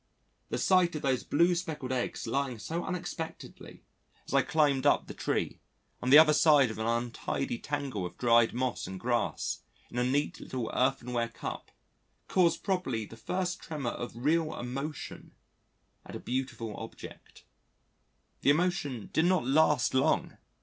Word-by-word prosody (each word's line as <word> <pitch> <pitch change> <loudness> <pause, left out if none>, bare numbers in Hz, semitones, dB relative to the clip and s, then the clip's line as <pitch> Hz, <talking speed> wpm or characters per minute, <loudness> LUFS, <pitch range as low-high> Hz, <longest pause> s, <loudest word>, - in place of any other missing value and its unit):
The - - -1
sight 180 -3 +3
of 155 - -4
those 130 -2 +1
blue 170 +4 +3
speckled 160 -7 -4
eggs 125 -2 -2
lying 130 +1 -1
so 165 +10 -4
unexpectedly, 175 -3 -6 0.4
as - - -7
I - - +5
climbed 145 -3 +2
up - - +3
the - - -8
tree, - - -2 0.4
on 125 - -1
the 140 - +10
other 155 -1 +8
side 150 -5 +5
of 110 - -8
an 110 - -1
untidy 120 +1 -2
tangle 140 -9 -3
of 90 - -6
dried 120 -1 +4
moss 125 -4 -2
and 95 0 -6
grass, 120 +2 -1 0.3
in 120 - -2
a - - +2
neat 140 +4 0
little 125 -4 -4
earthenware 125 -2 0
cup, - - -6 0.6
caused 180 -3 +2
probably 180 - -1
the 115 - -12
first 180 +10 -2
tremor 145 -6 -3
of 120 - -6
real 155 +6 +1
emotion 135 +5 -6 0.7
at - - -10
a - - -5
beautiful 120 -4 -3
object. - - -10 1.0
The - - +3
emotion 145 - 0
did 160 - +3
not 180 -8 +2
last 145 -1 +3
long! 130 - +2
135 Hz, 155 wpm, -30 LUFS, 120-160 Hz, 1.0 s, the